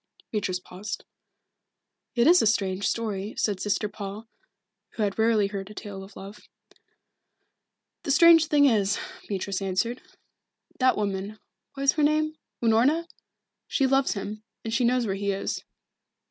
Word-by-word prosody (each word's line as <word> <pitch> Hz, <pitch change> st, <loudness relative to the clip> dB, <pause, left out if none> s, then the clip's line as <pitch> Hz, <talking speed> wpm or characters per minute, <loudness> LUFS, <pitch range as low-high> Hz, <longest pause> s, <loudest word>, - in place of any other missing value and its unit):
Beatrice 190 Hz, -4 st, -1 dB
paused. 185 Hz, +3 st, -7 dB, 1.1 s
"It 235 Hz, 0 st, +3 dB
is 350 Hz, +4 st, +7 dB
a -, -, +3 dB
strange 195 Hz, -2 st, +1 dB
story," 210 Hz, -2 st, -2 dB
said 205 Hz, -3 st, 0 dB
Sister 205 Hz, +2 st, 0 dB
Paul, 205 Hz, +2 st, -7 dB, 0.7 s
who 220 Hz, -, -2 dB
had 200 Hz, +1 st, -1 dB
rarely 220 Hz, -2 st, +3 dB
heard 195 Hz, 0 st, -5 dB
a 210 Hz, -, -11 dB
tale 195 Hz, -2 st, -7 dB
of 195 Hz, +1 st, -14 dB
love. 200 Hz, +2 st, -11 dB, 1.5 s
"The -, -, -7 dB
strange 330 Hz, +2 st, +7 dB
thing 290 Hz, -2 st, +4 dB
is 210 Hz, -6 st, +3 dB
this," 375 Hz, -, -5 dB, 0.2 s
Beatrice 195 Hz, -1 st, -3 dB
answered. 195 Hz, +6 st, -1 dB, 0.8 s
"That 255 Hz, 0 st, +4 dB
woman 200 Hz, 0 st, -3 dB, 0.4 s
what 275 Hz, -, -4 dB
is 275 Hz, -, +6 dB
her 305 Hz, -, 0 dB
name? 310 Hz, +1 st, +2 dB, 0.3 s
Unorna? 250 Hz, +9 st, +3 dB, 0.6 s
She 275 Hz, -, +1 dB
loves 270 Hz, 0 st, +2 dB
him, 205 Hz, +1 st, -6 dB, 0.2 s
and 225 Hz, -, -4 dB
she 245 Hz, +1 st, +2 dB
knows 245 Hz, 0 st, +2 dB
where 195 Hz, -, -1 dB
he 200 Hz, +1 st, -1 dB
is." 195 Hz, -, -3 dB
215 Hz, 150 wpm, -26 LUFS, 195-255 Hz, 1.5 s, is